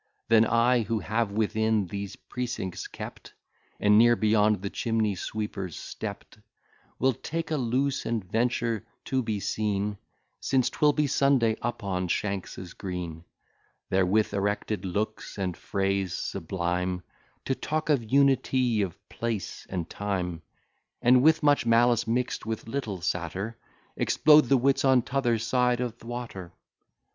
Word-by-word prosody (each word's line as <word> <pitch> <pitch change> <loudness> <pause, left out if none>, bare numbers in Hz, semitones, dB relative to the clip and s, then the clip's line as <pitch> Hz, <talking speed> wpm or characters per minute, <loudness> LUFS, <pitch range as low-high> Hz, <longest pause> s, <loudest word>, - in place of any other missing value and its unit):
Then 115 0 +6
I, 120 +1 +3
who 110 +1 -1
have 110 +3 -1
within 110 0 +1
these 100 +2 -5
precincts 120 -7 -5
kept, - - -9 0.4
And 105 +1 +5
ne'er 120 +1 +6
beyond 105 -2 +2
the 100 - -3
chimney 110 -3 0
sweeper's 95 -2 -4
stept, - - -7 0.6
Will 130 +1 +2
take 165 +7 -4
a - - +2
loose, 130 +2 0
and 115 -4 -1
venture 115 +2 0 0.2
to 130 -1 0
be 110 -3 -2
seen, 105 0 -1 0.4
Since 130 -2 +1
'twill 150 -1 +3
be 150 0 +1
Sunday, 135 -5 +3
upon 100 -6 -2
Shanks's 95 -1 -3
green; 85 -4 -6 0.7
There, 95 0 +4
with 105 +3 +2
erected 100 0 -1
looks 105 +5 -3
and 95 -3 -2
phrase 95 -2 -1
sublime, 90 0 -2 0.4
To 135 - +1
talk 155 +4 -3
of 120 -7 +1
unity 130 -4 +3
of 95 -4 -3
place 115 -4 -4
and 90 -3 -3
time, 90 -5 -3 0.6
And 125 +1 +6
with 160 +2 +4
much 145 -1 +4
malice, 120 0 +4
mix'd 125 +2 -1
with 110 0 -4
little 115 -8 -3
satire, 90 +6 -2 0.4
Explode 150 -1 +5
the 135 +2 +4
wits 135 +2 +2
on 130 -3 +4
t'other 125 -3 +1
side 125 +2 +1
o' 125 -1 -1
th' 115 - -22
water. 115 -7 -6
110 Hz, 140 wpm, -27 LUFS, 100-125 Hz, 0.7 s, Then